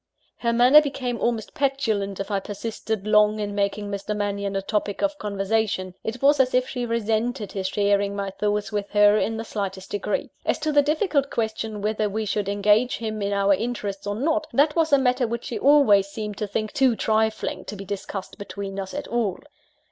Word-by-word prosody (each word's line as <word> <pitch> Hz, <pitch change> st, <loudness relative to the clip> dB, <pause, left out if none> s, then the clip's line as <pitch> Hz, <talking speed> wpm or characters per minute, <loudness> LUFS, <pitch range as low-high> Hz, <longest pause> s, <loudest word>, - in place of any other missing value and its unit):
Her 235 Hz, -, 0 dB
manner 250 Hz, +6 st, +7 dB
became 255 Hz, -5 st, -3 dB
almost 230 Hz, -3 st, -1 dB
petulant, 240 Hz, -9 st, -1 dB
if 195 Hz, -, -4 dB
I 200 Hz, -, +1 dB
persisted 215 Hz, +1 st, -4 dB
long 210 Hz, 0 st, +4 dB
in 205 Hz, -1 st, -3 dB
making 200 Hz, 0 st, -1 dB
Mr. 200 Hz, +1 st, -3 dB
Mannion 200 Hz, -1 st, -2 dB
a 195 Hz, -, 0 dB
topic 205 Hz, +2 st, -2 dB
of 295 Hz, 0 st, 0 dB
conversation 200 Hz, -2 st, -1 dB
it 235 Hz, +4 st, -5 dB
was 285 Hz, +1 st, +5 dB
as 255 Hz, -1 st, +3 dB
if 255 Hz, 0 st, +2 dB
she 245 Hz, -2 st, -3 dB
resented 225 Hz, 0 st, -1 dB
his 190 Hz, -2 st, -2 dB
sharing 200 Hz, 0 st, +1 dB
my 200 Hz, -1 st, -3 dB
thoughts 210 Hz, +1 st, -1 dB
with 205 Hz, -1 st, -2 dB
her 205 Hz, 0 st, +6 dB
in 225 Hz, +1 st, -1 dB
the 225 Hz, -, -3 dB
slightest 195 Hz, -3 st, -5 dB
degree. 205 Hz, 0 st, -2 dB
As -, -, 0 dB
to 310 Hz, 0 st, -1 dB
the 290 Hz, -1 st, +5 dB
difficult 295 Hz, -1 st, +1 dB
question 220 Hz, -2 st, -3 dB
whether 215 Hz, 0 st, 0 dB
we 215 Hz, +2 st, -2 dB
should 205 Hz, -1 st, -1 dB
engage 210 Hz, +4 st, +2 dB
him 215 Hz, -2 st, -4 dB
in 200 Hz, 0 st, -1 dB
our 200 Hz, 0 st, +3 dB
interests 205 Hz, -3 st, -3 dB
or 205 Hz, -, -1 dB
not, 310 Hz, +6 st, 0 dB
that 295 Hz, +2 st, +3 dB
was 325 Hz, -2 st, +2 dB
a 280 Hz, -, +7 dB
matter 250 Hz, -2 st, +2 dB
which 235 Hz, +1 st, -4 dB
she 235 Hz, -, -4 dB
always 265 Hz, -9 st, +5 dB
seemed 210 Hz, 0 st, -6 dB
to 210 Hz, -, -2 dB
think 215 Hz, +1 st, -3 dB
too 260 Hz, -4 st, +3 dB
trifling 220 Hz, 0 st, 0 dB
to -, -, -6 dB
be 195 Hz, 0 st, -8 dB
discussed 195 Hz, 0 st, -6 dB
between 200 Hz, -1 st, -6 dB
us 190 Hz, +4 st, -5 dB
at 290 Hz, -, -4 dB
all. 225 Hz, -6 st, -1 dB
215 Hz, 200 wpm, -24 LUFS, 200-245 Hz, -, manner